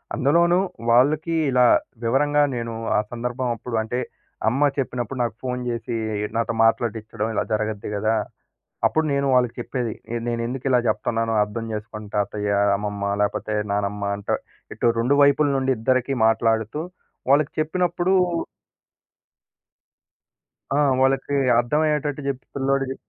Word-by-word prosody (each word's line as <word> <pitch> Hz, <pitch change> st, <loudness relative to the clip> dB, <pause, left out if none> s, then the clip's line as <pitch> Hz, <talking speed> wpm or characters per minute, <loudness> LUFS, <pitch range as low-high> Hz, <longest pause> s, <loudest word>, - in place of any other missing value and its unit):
అందులోనూ 170 Hz, +5 st, +3 dB, 0.3 s
వాళ్ళకి 150 Hz, +7 st, +3 dB, 0.2 s
ఇలా 125 Hz, -1 st, +5 dB, 0.4 s
వివరంగా 145 Hz, +5 st, +3 dB
నేను 115 Hz, -1 st, -4 dB, 0.2 s
ఆ -, -, +4 dB
సందర్భమాప్పుడు 120 Hz, 0 st, -3 dB
అంటే, 120 Hz, +3 st, -3 dB, 0.5 s
అమ్మ 140 Hz, +5 st, +2 dB
చెప్పినప్పుడు 125 Hz, -1 st, -3 dB
నాకు 115 Hz, -2 st, -3 dB
ఫోను 125 Hz, -1 st, -2 dB
జేసి 120 Hz, 0 st, -3 dB, 0.4 s
నాతో 115 Hz, 0 st, 0 dB
మాట్లాడిచ్చడం 110 Hz, -1 st, 0 dB
ఇలా -, -, +1 dB
జరగద్ది 105 Hz, -1 st, -2 dB
గదా! 110 Hz, +2 st, +1 dB, 0.7 s
అప్పుడు 160 Hz, 0 st, +2 dB
నేను 140 Hz, 0 st, +1 dB
వాళ్ళకి 125 Hz, -2 st, +3 dB
చెప్పేది 120 Hz, -1 st, -3 dB, 0.2 s
ఈడ 120 Hz, -, -1 dB
నేనెందుకు 120 Hz, +2 st, -3 dB
ఇలా 125 Hz, -1 st, +4 dB
జెప్తన్నానో 115 Hz, -1 st, 0 dB
అర్థం 105 Hz, +2 st, -5 dB
జేసుకోండి 105 Hz, 0 st, -7 dB
తాతయ్య, 105 Hz, 0 st, -1 dB, 0.3 s
అమ్మమ్మ 100 Hz, 0 st, -3 dB
లేకపోతే 105 Hz, +1 st, -1 dB, 0.2 s
నానమ్మ 100 Hz, 0 st, -1 dB
అంటా. 100 Hz, 0 st, -3 dB, 0.4 s
ఇటు -, -, 0 dB
2 125 Hz, +5 st, +2 dB
వైపుల 145 Hz, +1 st, +5 dB
నుండి 135 Hz, 0 st, +1 dB
ఇద్దరికీ 130 Hz, +3 st, +1 dB
మాట్లాడుతూ 110 Hz, +2 st, +1 dB, 0.5 s
వాళ్ళకి 140 Hz, +1 st, +4 dB
చెప్పినప్పుడు 175 Hz, +3 st, 0 dB, 2.6 s
ఆ! -, -, +3 dB, 0.2 s
వాళ్ళకి 135 Hz, +1 st, +1 dB, 0.2 s
అర్థమయ్యేటట్టు 150 Hz, +3 st, 0 dB
జెప్ 135 Hz, -1 st, -2 dB
పిల్లోడుకి 135 Hz, -1 st, 0 dB
125 Hz, 120 wpm, -23 LUFS, 110-140 Hz, 2.6 s, ఇలా